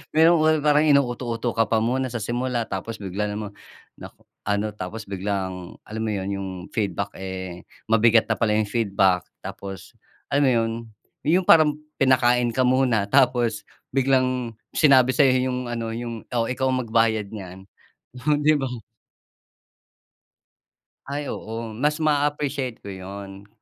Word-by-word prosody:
Meron 155 -1 +5
parang 150 0 +3
inuuto-uto 120 -5 +1
ka 115 - +4
pa 110 0 +1
muna 130 +2 -1
sa 120 - -3
simula 120 +1 -2
tapos 110 +4 -5
bigla 105 +1 -3
namang 105 -1 -6 0.4
nako, - - -13 0.2
ano 105 +1 -1
tapos 105 +3 -7
biglang, 95 -2 -4
alam 110 +1 -5
mo 110 - -1
yun 100 -1 -3
yung 100 -1 -4 0.3
feedback, 100 -2 -2
eh, 95 -2 -6 0.2
mabigat 115 0 +4
na - - +1
pala 115 -2 +1
yung 105 - 0
feedback 100 -5 +2 0.2
tapos, 95 -2 -8 0.3
alam 145 0 +2
mo 130 - +4
yun, 115 -2 +1 0.5
yung 175 +5 +2
parang 150 -2 +5 0.2
pinakain 125 -2 +3
ka 130 - +3
muna 125 -5 +2
tapos 125 -3 +2 0.3
biglang 130 -2 +1 0.2
sinabi 130 -4 +6
sa'yo 130 -2 +3
yung 125 0 -2
ano, 115 -1 -3
yung, 115 -1 -5
"Oh, 115 -2 +1
ikaw 130 +2 -1
ang 130 -1 0
magbayad 110 -2 +1
niyan", 95 -2 -9 0.6
oh 150 - +4
'di 150 +1 +4
ba. 135 - -2 2.4
Ay 145 0 -4
oo, 115 +1 -6
mas 150 +8 0
maappreciate 145 -4 0
ko 100 - -7
yun. 95 +1 -9
115 Hz, 140 wpm, -24 LUFS, 105-130 Hz, 2.4 s, sinabi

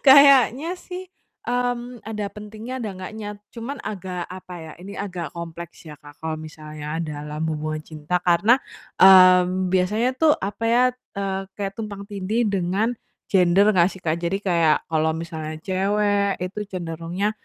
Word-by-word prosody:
Kayaknya 280 +3 +7
sih, 365 0 -8 0.4
mmm, 245 -1 -2
ada 210 -1 -4
pentingnya, 215 +3 -8
ada 215 - -3
enggaknya, 205 +3 -7 0.3
cuman 245 +4 -5
agak 185 -3 -5
apa 185 0 -9 0.2
ya - - -9
ini 200 +2 -8
agak 180 -5 -4
kompleks 170 0 -8
ya 150 - -8
Kak, 145 -1 -15
kalau 160 0 -3
misalnya 155 0 -7
dalam 150 -1 -5
hubungan 155 0 -3
cinta 155 +3 -3
karena, 190 +8 +4 0.4
mmm, 185 -1 +7
biasanya 205 +6 +2
tuh 315 -1 +6
apa 200 +3 -4
ya, 240 +2 +4 0.3
eee, 195 -1 -2
kayak 195 -1 -3
tumpang 205 -2 -5
tindih 205 +3 -1
dengan 195 +3 0 0.4
gender 190 +2 +5
gak 180 -3 +4
sih 185 - -13
kak? 160 0 0
Jadi 175 +4 -2
kayak 170 -4 +2
kalau 160 0 +1
misalnya 160 -1 -5
cewek, 200 +1 +1
itu 185 +3 -4
cenderungnya, 175 +3 -2
190 Hz, 150 wpm, -23 LUFS, 170-210 Hz, 0.4 s, Kayaknya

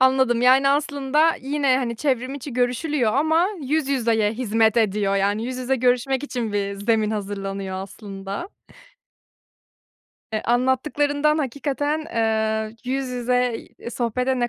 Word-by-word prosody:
Anladım. 260 -2 +3
Yani, 265 +2 +5
aslında 285 +2 +2
yine, 275 -1 +1
hani, 235 -3 -2
çevrim 260 0 -1
içi 280 0 -7
görüşülüyor 250 0 0
ama 320 +5 +3
yüz 290 +1 0
yüzeye 225 -5 +1
hizmet 225 -2 +1
ediyor, 205 -3 +2
yani, 205 +3 0
yüz 255 +1 -4
yüze 255 +1 0
görüşmek 255 +2 +1
için 240 -6 -3
bir 200 -1 -1
zemin 215 +1 +1
hazırlanıyor 195 -2 -4
aslında. 195 - -7 1.8
Eee, 215 - -1
anlattıklarından 285 +5 +1
hakikaten, 290 +2 -1
eee, 220 -5 -1
yüz 265 +1 -2
yüze, 250 0 0
iii, 235 - -11
sohbete 250 +2 -1
ne 240 - +1
250 Hz, 130 wpm, -23 LUFS, 220-275 Hz, 1.8 s, Yani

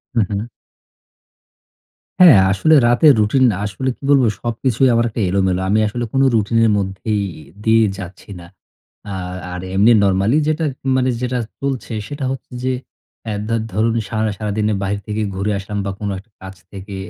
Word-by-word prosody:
হু, 115 - +3
হু। 105 +4 -4 1.7
হ্যাঁ, 170 - +9
আসলে 100 +12 +3
রাতের 140 +5 +5
রুটিন 110 +6 +2
না। 100 - -3
আসলে 120 +6 -3
কি - - -45
বলবো? 140 -3 +5 0.2
সবকিছুই 120 +2 +1
আমার 115 0 +2
একটা 110 - -4
এলোমেলো। 95 -1 +1
আমি 105 +2 +3
আসলে 120 +3 -4
কোন 135 - +2
রুটিনের 115 +1 +2
মধ্যেই 100 +2 -2 0.2
ই - - -13 0.2
দিয়ে 115 0 +4
যাচ্ছি 90 +1 -10
না। 85 - -12 0.6
আ - - -4 0.4
আর 90 - -5
এমনি 105 +5 +5
নরমালি 100 +7 +2
যেটা 155 +1 0 0.2
উম - - 0
মানে 130 0 +1
যেটা 125 0 -1 0.2
চলছে, 135 -4 -3
সেটা 145 -1 -5
হচ্ছে 135 - -7
যে 130 0 0 0.6
এ - - -2
দা 115 - 0 0.2
ধরুন 110 +3 +1
সারা 110 -1 -1
সারাদিনে 105 0 -1
বাহির 100 +1 -2
থেকে 105 0 -2
ঘুরে 100 +2 -1
আসলাম 100 +1 -6
বা, 100 - -2
কোন 105 - -3
একটা 105 +3 -20
কাজ 95 0 -9 0.2
থেকে 100 0 -8
110 Hz, 170 wpm, -18 LUFS, 100-125 Hz, 1.7 s, হ্যাঁ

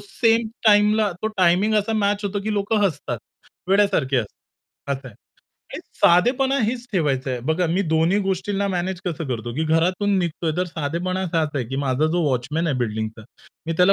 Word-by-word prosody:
Same 225 +2 +1 0.2
टाईमला 210 0 +4
तो 220 - +1
timing 185 +4 +3
असा 210 +2 0
मॅच 205 -1 0
होतो 200 0 -2
की 215 +1 -2
लोक 205 +1 -2
हसतात. 145 - -1 0.5
वेड्यासारखे 190 -9 +2
हसतात. 120 +4 -8
असं 130 -1 -11
आहे. 110 - -15 0.6
आणि - - -5 0.2
साधेपणा 265 +10 +4
हेच 245 +2 -3
ठेवायचं 140 -7 0
आहे. 125 -1 -3
बघा 175 +3 +1
मी 175 +4 +1
दोन्ही 165 +5 +3
गोष्टींना 195 +1 -1
मॅनेज 180 0 -2
कसं 165 -3 -3
करतो, 120 -1 -3
की 160 - -1
घरातून 180 +6 +1
निघतोय 170 -2 -1
तर 180 - +1
साधेपणा 170 +3 -3
असाच 165 -3 0
आहे, 130 - -1
की 135 - -4
माझा 135 +3 +1
जो 175 -1 +1
वॉचमन 135 +6 -1
आहे 145 -5 0
बिल्डिंगचा 110 -2 -3 0.4
मी 165 - -1
त्याला 180 +2 +5
175 Hz, 175 wpm, -22 LUFS, 145-205 Hz, 0.6 s, त्याला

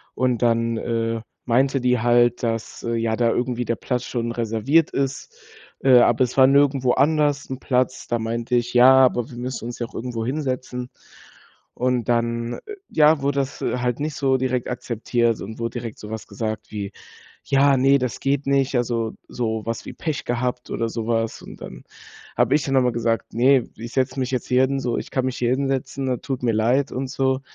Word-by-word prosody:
und 125 -2 0
dann, 115 -1 +2
äh, 115 0 -2 0.2
meinte 130 +3 +2
die 125 0 +2
halt, 120 +1 +3
dass, 115 -1 -3
äh, 115 - -2
ja 115 -1 0
da 115 0 +2
irgendwie 125 0 -1
der 115 - 0
Platz 125 -1 -2
schon 120 -1 -2
reserviert 120 +7 +1
ist, 135 -1 -3 0.5
äh, 130 -2 +7
aber 120 +2 +4
es 125 - -8
war 130 - +8
nirgendwo 135 -2 +3
anders 145 0 +2
'n 130 -1 -5
Platz. 130 0 -1
Da 120 - 0
meinte 115 +2 -3
ich: 120 0 0
„Ja, 125 +2 +8
aber 120 -2 0
wir 120 - -10
müssen 125 -1 -5
uns 120 0 -6
ja 120 - -2
auch - - -18
irgendwo 115 -1 -4
hinsetzen.“ 130 -2 -3 0.9
Und 125 -2 0
dann 115 0 0 0.3
ja, 155 -1 +4
wurde 140 0 +1
das 135 +1 -3
halt 125 -1 -1
nicht 150 +1 -2
so 135 -1 +2
direkt 130 -1 -1
akzeptiert 120 -1 -1
und 110 +3 -7
wurde 115 +1 -3
direkt 115 -2 -7
so 105 - -9
was 110 -1 -6
gesagt 110 -1 -4
wie: 100 -2 -4 0.5
„Ja 140 0 +4
ne, 135 +2 +5
das 125 -3 -3
geht 140 +1 0
nicht.“ 140 -1 +2
Also, 115 -2 0
so 110 -2 -3
was 115 0 -3
wie - - -7
Pech 155 -3 -3
gehabt 125 +1 -2
oder 115 - -1
sowas 115 0 -2
und - - -12
dann 65 -1 -9 0.6
habe - - +3
ich 150 - +3
dann 135 - -3
noch 135 - +5
mal 125 - +2
gesagt: 115 -1 -1
„Ne, 130 +2 +4
ich 115 +2 -8
setze 130 0 0
mich 130 -1 -1
jetzt 125 - -2
hier 125 +1 +4
hin 135 +1 +1
so. 120 -2 -1
Ich - - -6
kann 130 -1 0
mich 130 - -2
hier 120 -1 +1
hinsetzen, 135 -1 -1
tut 130 -2 -4
mir 120 -2 +2
leid 120 +6 +2
und 130 0 -3
so.“ 130 -1 0
125 Hz, 200 wpm, -22 LUFS, 115-130 Hz, 0.9 s, war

